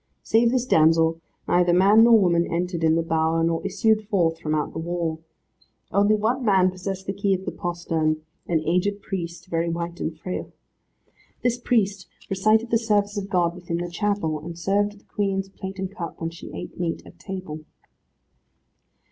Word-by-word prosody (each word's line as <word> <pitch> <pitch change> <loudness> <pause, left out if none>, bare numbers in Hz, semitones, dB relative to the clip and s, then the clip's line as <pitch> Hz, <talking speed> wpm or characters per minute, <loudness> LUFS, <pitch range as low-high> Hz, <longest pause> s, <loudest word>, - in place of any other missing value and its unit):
Save 230 +1 +3
this 250 0 +1
damsel, 165 -3 +4 0.3
neither 175 0 +3
man 200 +5 +6
nor 230 -1 +7
woman 170 -3 +2
entered 170 0 -2
in 160 0 +4
the 165 - +1
bower, 160 0 +1
nor 165 0 0
issued 215 +2 +1
forth 170 -6 +1
from 155 0 -1
out 150 - -2
the - - -4
wall. 165 -1 -2 0.7
One 205 +1 +3
only 240 +5 0
man 190 -4 +4
possessed 190 +1 -5
the 195 - -2
key 200 -1 +1
of 190 +1 -7
the - - -2
postern, 165 -3 -1 0.3
an 165 -2 +1
aged 195 +4 0
priest, 170 -3 -5
very 170 -1 -1
white 170 +1 -4
and 160 0 -3
frail. 180 +3 -5 0.9
This 245 0 +1
priest 200 -7 0 0.2
recited 215 +4 +2
the 230 - +4
service 205 -2 +1
of 200 -1 -4
God 175 -3 +2
within 175 -1 -4
the 175 0 -4
chapel, 200 -5 -1
and 165 +2 -8
served 205 +3 0
the - - -28
Queen's 195 -2 -2
plate 190 0 -8
and 190 +1 -5
cup 170 -5 -6
when 165 0 -3
she 170 - -10
ate - - -8
meat 170 -2 -2
at - - -15
table. 185 -6 -6
180 Hz, 180 wpm, -24 LUFS, 165-205 Hz, 0.9 s, nor